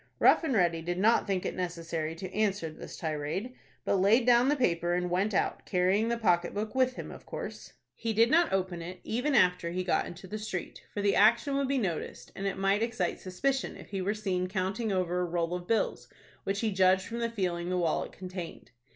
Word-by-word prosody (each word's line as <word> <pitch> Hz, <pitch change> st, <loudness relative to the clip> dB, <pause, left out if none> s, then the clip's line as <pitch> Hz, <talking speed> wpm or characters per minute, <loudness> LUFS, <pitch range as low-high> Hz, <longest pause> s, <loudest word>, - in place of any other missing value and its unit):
Rough -, -, +5 dB
and 280 Hz, -6 st, 0 dB
Ready 170 Hz, -4 st, +2 dB
did 175 Hz, +2 st, -3 dB
not 220 Hz, +5 st, +3 dB
think 190 Hz, -2 st, -1 dB
it -, -, -1 dB
necessary 165 Hz, -3 st, -3 dB
to 185 Hz, +2 st, -7 dB
answer 200 Hz, -6 st, 0 dB
this -, -, -10 dB
tirade, 160 Hz, +9 st, -3 dB, 0.3 s
but 200 Hz, -, +2 dB
laid 225 Hz, +5 st, +4 dB
down 245 Hz, +1 st, +5 dB
the 295 Hz, -, +3 dB
paper 175 Hz, -, +1 dB
and 180 Hz, 0 st, -1 dB
went 195 Hz, +4 st, +1 dB
out, 195 Hz, -, 0 dB
carrying 190 Hz, +4 st, +2 dB
the 235 Hz, 0 st, 0 dB
pocket 175 Hz, -6 st, +1 dB
book 210 Hz, +1 st, -3 dB
with 255 Hz, -1 st, +2 dB
him, -, -, -7 dB
of -, -, -12 dB
course. -, -, -7 dB, 0.2 s
He 230 Hz, -, -3 dB
did 230 Hz, +2 st, +4 dB
not 335 Hz, +1 st, +4 dB
open 185 Hz, -3 st, -1 dB
it, 180 Hz, +2 st, -7 dB
even 255 Hz, +6 st, 0 dB
after 180 Hz, -4 st, +3 dB
he 180 Hz, +2 st, -2 dB
got 180 Hz, -, +1 dB
into 175 Hz, +2 st, -10 dB
the 215 Hz, +3 st, -5 dB
street, 200 Hz, -4 st, -5 dB
for 205 Hz, -, -3 dB
the 200 Hz, -1 st, +3 dB
action 235 Hz, +7 st, +4 dB
would 275 Hz, -1 st, +1 dB
be 275 Hz, +1 st, +1 dB
noticed, 185 Hz, -10 st, -3 dB
and 195 Hz, -, -3 dB
it 195 Hz, -, -2 dB
might 195 Hz, +2 st, +2 dB
excite 225 Hz, -7 st, -1 dB
suspicion 260 Hz, +9 st, -2 dB
if -, -, -12 dB
he 195 Hz, -1 st, -3 dB
were 200 Hz, +3 st, 0 dB
seen 185 Hz, -4 st, -1 dB
counting 195 Hz, +4 st, -2 dB
over 180 Hz, -2 st, 0 dB
a -, -, +1 dB
roll 170 Hz, 0 st, -1 dB
of 180 Hz, 0 st, -5 dB
bills, 225 Hz, -, 0 dB, 0.4 s
which 200 Hz, +1 st, -1 dB
he 220 Hz, -2 st, +1 dB
judged 190 Hz, 0 st, +4 dB
from 235 Hz, +1 st, -5 dB
the 235 Hz, 0 st, 0 dB
feeling 180 Hz, -5 st, -2 dB
the 185 Hz, -, 0 dB
wallet 170 Hz, -3 st, 0 dB
contained. 180 Hz, -2 st, -8 dB
190 Hz, 220 wpm, -30 LUFS, 180-225 Hz, 0.4 s, Rough